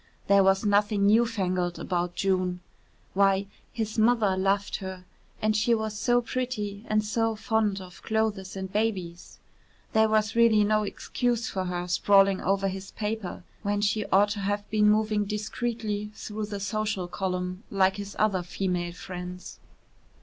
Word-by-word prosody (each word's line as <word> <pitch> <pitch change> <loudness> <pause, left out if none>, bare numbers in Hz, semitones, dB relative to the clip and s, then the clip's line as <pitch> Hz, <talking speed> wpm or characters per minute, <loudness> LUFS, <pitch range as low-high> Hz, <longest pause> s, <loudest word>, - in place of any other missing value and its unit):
There 200 0 +5
was 195 +1 +3
nothing 205 0 +3
new 225 +3 +5
fangled 185 -5 -1
about 175 -1 -2
June. 185 -2 0 0.5
Why, 195 0 +3 0.3
his 220 -1 -3
mother 220 -4 +3
loved 195 +1 0
her 190 -1 -7 0.4
and 215 0 +2
she 230 +2 +3
was 220 -1 -3
so 245 +2 +2
pretty 220 -5 -3
and 215 0 +2
so 225 +1 0
fond 215 -3 0
of 180 -1 -12
clothes 215 -4 -1
and 190 0 -6
babies. 190 -6 -2 0.6
There 220 0 +4
was 215 0 +1
really 230 -2 +5
no 215 +1 +2
excuse 235 +2 -2
for 190 -1 -2
her 180 0 -3
sprawling 195 +2 +4
over 195 +1 +1
his 190 0 -5
paper 210 -4 -4 0.2
when 205 0 -1
she 210 +1 0
ought 200 +2 +4
to 205 0 -3
have 205 +1 -2
been 210 -1 +4
moving 215 0 +2
discreetly 210 0 -3
through 215 0 -5
the 205 -1 -5
social 205 -2 -2
column 180 0 -3
like 190 -1 +2
his 200 0 -7
other 205 -4 +2
female 175 -1 -2
friends. 180 0 -8
205 Hz, 155 wpm, -27 LUFS, 190-215 Hz, 0.6 s, There